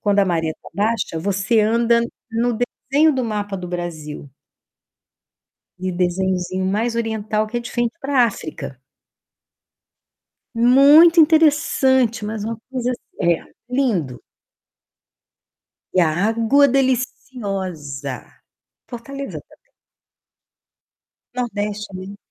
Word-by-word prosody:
Quando 205 -1 +1
a - - +4
maré 165 -3 0
tá - - -11
baixa, 215 -5 -1
você 200 +5 +1
anda 235 +2 +3 0.3
no 230 0 0 0.3
desenho 305 +2 +5
do 260 -1 -1
mapa 205 -3 -3
do 180 -1 -7
Brasil. 160 -5 -6 1.5
E 185 0 -2
o - - -7
desenhozinho 185 0 -1
mais 220 +5 0
oriental 220 -2 -1
que 240 +3 -3
é - - -1
de 235 - -8
frente 240 -1 -1
pra 270 -3 +3
África. 155 - -6 1.8
Muito 280 +8 +7
interessante, 285 -7 +3
mas 210 0 -4
uma 225 +2 -3
coisa 250 -2 -2
assim 205 -7 -2
É, 165 - -6 0.3
lindo. 210 - -1 1.7
E 185 - +4
a 165 - +3 0.2
água 230 +6 +4
deliciosa. 195 - -2 0.6
Fortaleza 275 +3 -7
também. - - -24 1.8
Nordeste 210 -3 -3
é - - -9
lindo. 190 +2 -8
220 Hz, 110 wpm, -20 LUFS, 185-250 Hz, 1.8 s, Muito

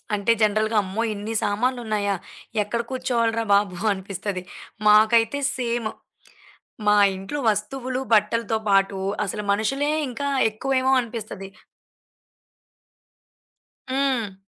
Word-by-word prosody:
అంటే, 205 +3 +1
జనరల్‌గా 215 +1 +2
అమ్మో! 200 +4 -2
ఇన్ని 210 +2 -5
సామాన్లున్నాయా, 215 -2 0 0.5
ఎక్కడ 235 +3 -2
కూర్చోవాలిరా 230 -3 0
బాబు 200 -3 +2 0.2
అనిపిస్తది. 190 0 -5 0.5
మాకైతే 225 +5 +5 0.2
సేము. 235 -3 -2 1.0
మా 210 - +6 0.2
ఇంట్లో 195 +10 -5
వస్తువులు, 255 +4 -2
బట్టలతో 220 +1 +2
పాటు 195 0 +3 0.3
అసలు 210 +2 -4
మనుషులే 270 +8 0 0.2
ఇంకా 280 +3 -4 0.2
ఎక్కువేమో 260 +4 0
అనిపిస్తది. 220 -5 -6 2.4
హ్మ్. 255 -7 -1
220 Hz, 90 wpm, -23 LUFS, 205-245 Hz, 2.4 s, మా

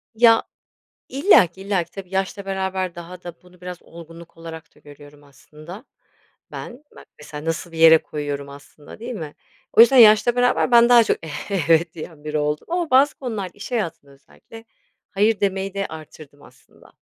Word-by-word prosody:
Ya 230 0 +5 0.7
İllaki, 225 - +3
illaki. 195 -4 -2
Tabii 195 -2 -10
yaşla 195 +1 -3
beraber 190 -2 -3
daha 175 +1 -11
da 175 -1 -10
bunu 180 0 -22
biraz 180 -1 -8
olgunluk 165 0 -14
olarak 165 -1 -11
da - - -22
görüyorum 145 0 -16
aslında 155 - -14 0.7
ben. 250 +4 -9
Bak - - -14
mesela, 150 0 -10
nasıl 165 +1 -4
bir 165 - -10
yere 160 0 +7
koyuyorum 145 -2 -6
aslında, 145 +4 -15
değil 240 +2 -7
mi? 155 -6 -8 0.4
O 225 - +7
yüzden 260 +3 +6
yaşla 225 +1 +6
beraber 245 0 +1
ben 235 0 +6
daha 240 -1 +7
çok - - 0 0.5
evet 165 0 +3
diyen 155 -2 -11
biri 150 0 -3
oldum 150 0 -3
ama 345 -2 -2
bazı 270 +3 +4
konularda 215 -8 -6
iş 205 - -11
hayatında 170 - -4
özellikle 225 +11 -17 0.5
hayır 210 +2 +1
demeyi 195 -1 -2
de 200 0 -3
artırdım 155 -2 -13
aslında. - - -22
180 Hz, 165 wpm, -21 LUFS, 155-220 Hz, 0.7 s, yere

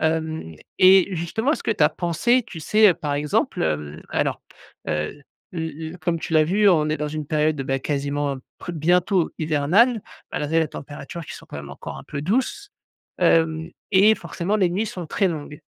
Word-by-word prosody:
Hem 160 - -1 0.2
et 190 0 +7
justement 220 - 0
est-ce - - -3
que - - -1
tu - - +3
as - - +6
pensé 210 +9 +1
tu 195 -8 -9
sais, 215 +7 +5
heu, 180 - +4
par 150 -4 -3
exemple, 145 0 0
hem 75 -1 -2
alors, - - -1 0.5
heu, 75 - -3 0.3
l 165 -2 -3 0.3
l 180 - -11
comme 165 +1 0
tu 160 - -6
l'as 155 -1 +6
vu, 200 +6 +3
on 155 -5 +4
est 155 - 0
dans 150 -1 -3
une 155 0 -5
période, 155 -1 +1
bah, 135 0 -1
quasiment 140 0 -2 0.4
bientôt 175 +3 +2
hivernale, 170 - +3 0.3
malgré 150 +2 0
les 160 - 0
températures 145 +4 -8
qui - - -8
sont - - -12
quand - - -8
même 70 0 -8
encore 70 - -8
un - - -11
peu 140 -2 -5
douces, 265 - -1 0.5
hem, 160 -1 +2 0.2
et 205 +3 +6
forcément 195 0 -2
les 185 -4 +2
nuits 200 +6 -1
sont 180 -4 -6
très 195 +5 +1
longues 150 -3 -6
160 Hz, 190 wpm, -23 LUFS, 145-190 Hz, 0.5 s, et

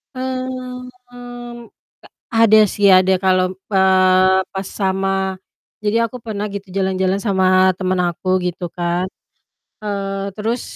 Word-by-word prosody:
Mmm, 255 -1 -5 0.2
ta 245 - -18 1.3
ada 220 -1 +6
sih, 205 -1 +3
ada 185 +1 +5
kalau, 185 -1 +3 0.3
eee, 190 0 +4
pas 190 0 -5
sama 190 0 -1 0.5
jadi 210 +2 +1
aku 230 +2 -5
pernah 215 -3 -5
gitu 200 -1 -7
jalan-jalan 190 0 0
sama 195 -4 +1 0.3
temen 185 -1 0
aku 175 +2 -6 0.2
gitu 180 +1 -3
kan. 175 +1 -1 0.8
Eee, 195 -1 -3
terus 225 +3 -2
195 Hz, 115 wpm, -19 LUFS, 185-215 Hz, 1.3 s, ada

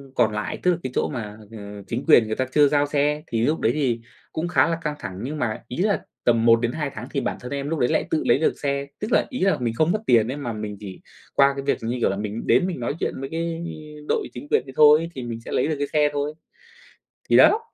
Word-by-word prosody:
còn 115 -3 +3
lại, 105 0 -3
tức 180 - +4
là 175 - 0
cái 130 - -3
chỗ - - +1
mà, 105 -4 -5
ờ, 105 -2 -9
chính 120 +3 -3
quyền 120 -8 +7
người 110 - -2
ta 130 - 0
chưa 145 -1 +5
giao 145 0 +2
xe, 150 +1 0
thì 115 -1 -1
lúc 155 +4 +1
đấy 115 - +2
thì 125 -6 0 0.3
cũng 160 +2 -2
khá 175 - +3
là 165 - 0
căng 150 -2 -2
thẳng, 95 -3 -6
nhưng 150 +4 -4
mà 110 -5 -2
ý 125 - -7
là 200 +3 +1 0.2
tầm 115 -1 +3
1-2 120 +6 +3
tháng 120 +3 -7
thì 140 - 0
bản - - -2
thân 125 - -8
em 140 0 -3
lúc 160 -1 -1
đấy 125 - +2
lại - - +1
tự 155 - 0
lấy - - +4
được 160 - +1
xe, 140 -1 -1
tức 210 +3 -4
là, - - +4
ý 255 - -5
là, 195 +1 +3
mình 120 -2 -1
không 155 +7 +2
mất 215 - 0
tiền 115 -2 +5
ấy 140 - -5
mà 120 -6 -4
mình 105 -1 -5
chỉ 95 -3 -9 0.3
qua 140 0 +5
cái 140 - -4
việc, 140 - +1
như 115 +2 -2
kiểu - - +2
là, 95 - -2
mình 105 +2 -4
đến 180 - +4
mình 180 -7 -4
nói 120 +4 -2
chuyện - - -1
với 135 - -5
cái 165 +1 -3 0.5
đội - - 0
chính 125 +4 -8
quyền 125 - +3
đấy 135 - -10
thôi, 155 +2 +6
thì 130 - -5
mình 115 -1 -5
sẽ - - -7
lấy 125 - +1
được 155 - 0
cái 145 - -1
xe 150 -1 +4
thôi. 145 +1 -2 1.0
Thì - - +5
đó, 435 - +7
140 Hz, 275 wpm, -23 LUFS, 115-150 Hz, 1.0 s, quyền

